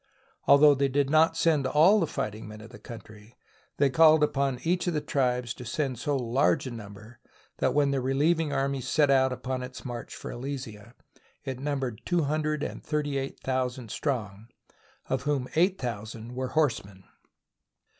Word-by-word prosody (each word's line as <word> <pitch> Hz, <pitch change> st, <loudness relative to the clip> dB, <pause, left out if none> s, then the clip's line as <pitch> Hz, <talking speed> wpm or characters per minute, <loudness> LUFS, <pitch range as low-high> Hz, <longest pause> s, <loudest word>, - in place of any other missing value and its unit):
Although 145 Hz, +1 st, +7 dB
they 140 Hz, 0 st, +1 dB
did 140 Hz, +1 st, 0 dB
not 160 Hz, +1 st, +4 dB
send 155 Hz, -5 st, +2 dB
all 165 Hz, +10 st, +5 dB
the 165 Hz, -, +1 dB
fighting 105 Hz, -3 st, -4 dB
men 105 Hz, 0 st, -10 dB
of 110 Hz, +1 st, -12 dB
the 105 Hz, -, -12 dB
country, 110 Hz, +1 st, -12 dB, 0.4 s
they 140 Hz, -2 st, +3 dB
called 155 Hz, 0 st, +6 dB
upon 140 Hz, -3 st, 0 dB
each 180 Hz, +2 st, 0 dB
of 175 Hz, -, 0 dB
the -, -, +2 dB
tribes 125 Hz, -4 st, -1 dB
to -, -, -10 dB
send 130 Hz, 0 st, -2 dB
so 145 Hz, -1 st, 0 dB
large 130 Hz, +4 st, +1 dB
a 130 Hz, -, -5 dB
number 105 Hz, +1 st, -11 dB, 0.4 s
that -, -, +1 dB
when 145 Hz, -1 st, +3 dB
the 135 Hz, -1 st, 0 dB
re 130 Hz, +1 st, -1 dB
lieving 160 Hz, +1 st, +2 dB
army 135 Hz, -1 st, -1 dB
set 145 Hz, +2 st, +2 dB
out 130 Hz, -1 st, +4 dB
upon 125 Hz, 0 st, -4 dB
its 130 Hz, +2 st, -8 dB
march 120 Hz, -2 st, -6 dB
for -, -, -7 dB
Alesia 120 Hz, -4 st, -7 dB, 0.5 s
it 130 Hz, -2 st, -5 dB
numbered 135 Hz, -5 st, -3 dB
two 175 Hz, -2 st, +1 dB
hundred 155 Hz, +1 st, -1 dB
and -, -, -5 dB
thirty 145 Hz, -2 st, -1 dB
eight 135 Hz, 0 st, -6 dB
thousand 130 Hz, -3 st, -2 dB
strong, 110 Hz, -7 st, -3 dB, 0.6 s
of 130 Hz, -1 st, -1 dB
whom 140 Hz, -2 st, -1 dB
eight 185 Hz, +4 st, +3 dB
thousand 115 Hz, 0 st, -6 dB
were 130 Hz, +1 st, -3 dB
horsemen. 115 Hz, -10 st, -1 dB
135 Hz, 175 wpm, -27 LUFS, 120-150 Hz, 0.6 s, Although